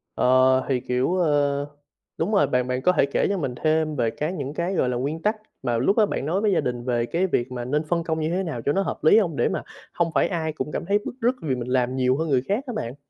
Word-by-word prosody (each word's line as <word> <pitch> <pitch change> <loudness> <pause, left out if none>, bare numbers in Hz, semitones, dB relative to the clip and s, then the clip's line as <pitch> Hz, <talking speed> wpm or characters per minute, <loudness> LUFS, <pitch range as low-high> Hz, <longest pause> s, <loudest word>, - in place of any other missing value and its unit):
Ờ, 130 +1 +4
thì, 130 -2 +2
kiểu, 130 +7 0
ơ, 145 -4 +1 0.5
đúng 215 - -1
rồi, 200 - +4
bạn 125 0 0
bạn 125 0 -1
có 180 - +4
thể 155 -6 +3
kể 140 - 0
cho 200 - 0
mình 130 -7 -3
thêm 155 -1 +1
về 115 -3 +1
cái 155 +9 -3
những 140 -3 -4
cái, 175 +4 -2
gọi 125 - +1
là, 125 - -1
nguyên 145 +6 -3
tắc 215 +1 +1 0.3
mà 120 -3 0
lúc 165 - +2
đó 215 - +6
bạn 135 - -3
nói 180 +6 0
với 210 -2 +2
gia 180 - +2
đình 120 -1 -3
về 120 -2 0
cái 180 +8 0
việc 125 -6 -1
mà 120 -1 -4
nên 150 +4 0
phân 170 +2 -1
công 160 -1 -2
như 155 0 -1
thế 185 +3 -1
nào 145 -9 -4
cho 145 - +3
nó 195 - +1
hợp - - -4
lý 180 +7 +6
hông? 170 -9 +1
Để - - +1
mà - - -3 0.3
không 170 -1 0
phải - - +3
ai 160 -4 -2
cũng 150 - -4
cảm - - -4
thấy 205 +2 +2
bứt - - -4
rứt 245 +3 +2
vì 135 -5 -1
mình 120 0 -5
làm 125 0 +1
nhiều 130 +1 +2
hơn 160 0 -2
người 130 -3 +3
khác 210 +7 0
á 245 - -4
bạn? 120 +3 -4
150 Hz, 295 wpm, -24 LUFS, 125-175 Hz, 0.5 s, đó